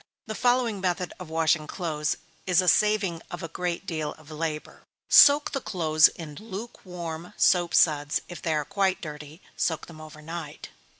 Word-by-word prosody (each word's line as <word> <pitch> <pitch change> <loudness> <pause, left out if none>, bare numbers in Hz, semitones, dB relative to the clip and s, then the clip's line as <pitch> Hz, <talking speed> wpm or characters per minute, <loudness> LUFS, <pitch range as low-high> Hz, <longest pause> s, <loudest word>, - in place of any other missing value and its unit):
The 215 - -5
following 245 -3 +1
method 180 -1 -1
of 180 -3 -9
washing 160 -1 +1
clothes 155 -5 -2 0.3
is 180 -1 +4
a 185 - +2
saving 195 0 +2
of 175 0 -7
a - - -3
great 175 +2 -4
deal 155 -5 -3
of 155 0 -16
labor: 155 0 -5 0.3
Soak 290 +1 +7
the 275 - -3
clothes 155 -7 +4
in 160 -3 -9
lukewarm 180 -6 -7
soap 175 -2 +3
suds; 150 -2 +3
if 175 - -9
they 160 -2 0
are 150 -1 -1
quite 195 -2 0
dirty, 150 0 -9
soak 160 -2 -1
them 155 -2 -12
over 155 -1 -11
night. 165 +2 -7
170 Hz, 170 wpm, -26 LUFS, 155-190 Hz, 0.3 s, Soak